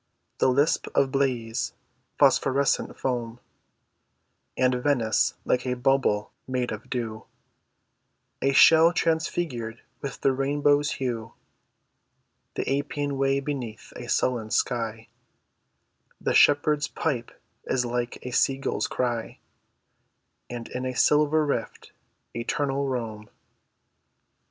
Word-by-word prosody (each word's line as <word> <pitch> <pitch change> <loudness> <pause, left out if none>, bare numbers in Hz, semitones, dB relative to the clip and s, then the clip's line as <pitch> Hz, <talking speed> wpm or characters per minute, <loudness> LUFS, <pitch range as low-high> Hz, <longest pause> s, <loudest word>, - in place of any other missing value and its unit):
The - - +4
lisp 140 +5 +2
of 135 -1 +3
Baiæ's 125 -5 -1 0.4
phosphorescent 135 +1 +2
foam; 120 -2 -3 1.2
And 130 0 +3
Venice 125 -3 +1
like 125 - +1
a 125 - 0
bubble 125 -5 +1 0.2
made 125 -1 -1
of 110 0 -7
dew, 115 -3 -4 1.2
A 135 - +2
shell 165 +4 +7
transfigured 160 -9 -1 0.2
with 140 - -6
the 135 - +3
rainbow's 145 +2 +2
hue; 115 -4 -4 1.2
The 135 +2 0
Appian 145 0 -3
Way 135 0 +2
beneath 130 -6 -6
a - - -8
sullen 120 -4 0
sky, 110 -1 -1 1.1
(The - - -1
shepherd's 145 +1 +4
pipe 125 -7 -3 0.3
is 125 -1 0
like 120 0 -2
a 125 - -4
seagull's 135 +2 +1
cry) 120 -3 -2 1.1
And 120 -1 -6
in 125 - -4
a 130 0 -3
silver 150 +1 +4
rift, 120 -6 -3 0.4
eternal 140 +3 -1
Rome. 110 -5 -4
130 Hz, 105 wpm, -26 LUFS, 120-140 Hz, 1.2 s, shell